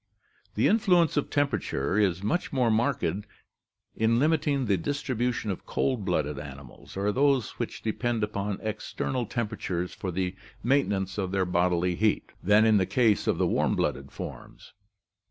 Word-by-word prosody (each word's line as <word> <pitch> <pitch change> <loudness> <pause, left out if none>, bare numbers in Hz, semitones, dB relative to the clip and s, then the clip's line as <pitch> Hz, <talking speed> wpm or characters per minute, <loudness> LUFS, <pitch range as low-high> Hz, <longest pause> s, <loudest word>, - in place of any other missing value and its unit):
The - - +3
influence 180 -7 +3
of 145 - 0
temperature 140 - 0
is 95 -3 +1
much 175 - -1
more 125 -4 +2
marked 120 +5 +1
in 100 +3 -1 1.0
limiting 145 -2 +2
the 100 -3 +2
distribution 125 - -1
of 95 - -7
cold 125 -7 0
blooded 75 -6 -1
animals 70 +2 -10
or 100 +1 +1
those 135 0 +2
which - - -4
depend 115 0 -1
upon 105 -1 -2
external 110 +3 -3
temperatures 95 -6 -3
for 95 - -5
the 90 +1 -2 0.3
maintenance 105 -7 +1
of 95 -2 -1
their 95 -1 +1
bodily 90 0 +1
heat, 110 +4 0
than 105 +3 +5
in 110 -1 +5
the 95 -2 +1
case 105 0 +2
of - - +2
the - - +2
warm - - +1
blooded - - -2
forms. - - -9
105 Hz, 155 wpm, -27 LUFS, 95-130 Hz, 1.0 s, than